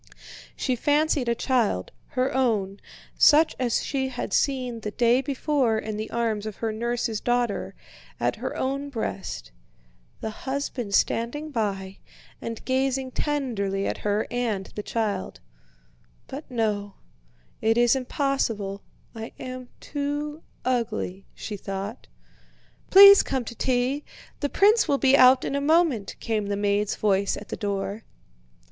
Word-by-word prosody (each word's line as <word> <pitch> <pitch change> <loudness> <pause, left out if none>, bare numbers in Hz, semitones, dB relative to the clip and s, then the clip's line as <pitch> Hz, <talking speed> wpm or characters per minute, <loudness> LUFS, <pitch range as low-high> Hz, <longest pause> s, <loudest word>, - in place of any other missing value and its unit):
She 255 - 0
fancied 290 -1 +1
a 235 - +2
child, 230 - 0 0.3
her 255 +1 +1
own—such 250 +6 +2
as 245 -3 +1
she 265 -2 -1
had 255 -2 -5
seen 255 -4 0
the 215 - -4
day 240 +4 +3
before 270 -4 +1
in 220 -1 -4
the 215 +1 -4
arms 225 -3 -1
of 215 - -6
her 225 -1 -2
nurse's 230 -1 -2
daughter—at 240 -4 -2
her - - -4
own 275 +2 -2
breast, 90 - -5 0.7
the 220 - -4
husband 260 -4 -3
standing 295 +7 0
by 195 -5 -3 0.4
and 230 -1 -6
gazing 265 0 0
tenderly 230 -11 -1
at - - -2
her 210 +1 0
and 230 -5 -1
the 210 - -4
child. 210 -3 -2 0.9
"But 285 +3 -8
no, 210 -4 -1 0.7
it 225 +1 +2
is 240 +1 +5
impossible, 245 -7 -1 0.3
I 225 -1 -7
am 255 -1 -7
too 295 +1 -3 0.2
ugly," 225 -6 -2
she 210 - -6
thought. 195 +4 -6 0.8
"Please 400 +1 +10
come 260 -3 -2
to 235 - -6
tea. 255 +4 0 0.4
The 285 - -1
prince 425 +7 +4
will 280 - +2
be 270 0 +5
out 255 0 +6
in - - -2
a 280 - 0
moment," 305 - +2
came 215 -3 -1
the 200 0 -1
maid's 205 0 +1
voice 200 -1 +1
at - - -10
the - - -3
door. 200 +1 -3
240 Hz, 135 wpm, -25 LUFS, 210-270 Hz, 0.9 s, Please